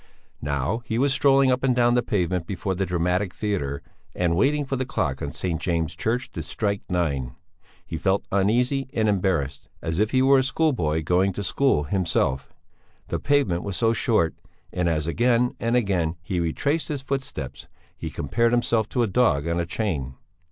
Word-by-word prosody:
Now 70 - -1
he 110 - -2
was 135 +2 +3
strolling 135 -1 +4
up 125 0 +1
and 130 -2 +3
down 120 -1 +4
the 125 - +3
pavement 90 -6 -1
before 95 0 -2
the 95 +1 -2
Dramatic 90 +2 0
Theatre 90 -10 -2 0.3
and 85 -2 +1
waiting 145 - +2
for 135 - -2
the 130 - -1
clock 75 - -2
on 70 - -3
St. 85 -1 -2
James' 85 -3 -1
Church 120 +3 -1
to - - -5
strike 100 -2 -2
nine; 70 -9 -1 0.5
he 80 - -5
felt 95 +3 +1
uneasy 125 +7 +1
and 110 -1 +2
embarrassed, 90 -9 0
as 80 +2 -3
if 105 0 +2
he 130 +1 +2
were 135 0 +6
a - - +2
schoolboy 125 - 0
going 90 +4 +2
to 100 - -4
school 100 - +2
himself; 75 -5 0 0.6
the - - -1
pavement 140 -12 +1
was 100 -2 -4
so 115 -1 +3
short, 110 -8 +2 0.4
and 90 -1 +1
as 75 -2 0
again 120 +7 +2
and 115 +1 0
again 90 -8 +1
he 90 +1 -2
retraced 140 - 0
his 145 -3 -4
footsteps 130 - -5 0.3
he - - -5
compared 115 - 0
himself 115 -2 +1
to 125 - +1
a - - +1
dog 90 - +2
on 85 +1 0
a 85 - -2
chain. 75 - -2
100 Hz, 185 wpm, -24 LUFS, 85-125 Hz, 0.6 s, were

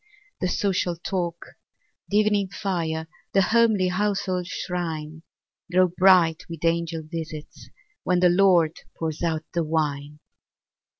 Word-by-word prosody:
The 185 - 0
social 180 -2 0
talk, 170 -1 -3 0.6
the 205 - +1
evening 210 -2 +2
fire, 165 -5 -3 0.3
The 195 - +4
homely 220 -3 +3
household 190 -2 -1
shrine, 160 -3 -4 0.5
Grow 185 0 +4
bright 180 -3 +4
with 165 -1 -5
angel 165 -1 0
visits, 155 -1 -8 0.3
when 180 -1 +2
The 180 0 +5
Lord 175 -3 +4 0.2
pours 160 -2 -3
out 160 -2 -1
the 170 - +1
wine. 150 -2 -2
175 Hz, 120 wpm, -24 LUFS, 160-185 Hz, 0.6 s, The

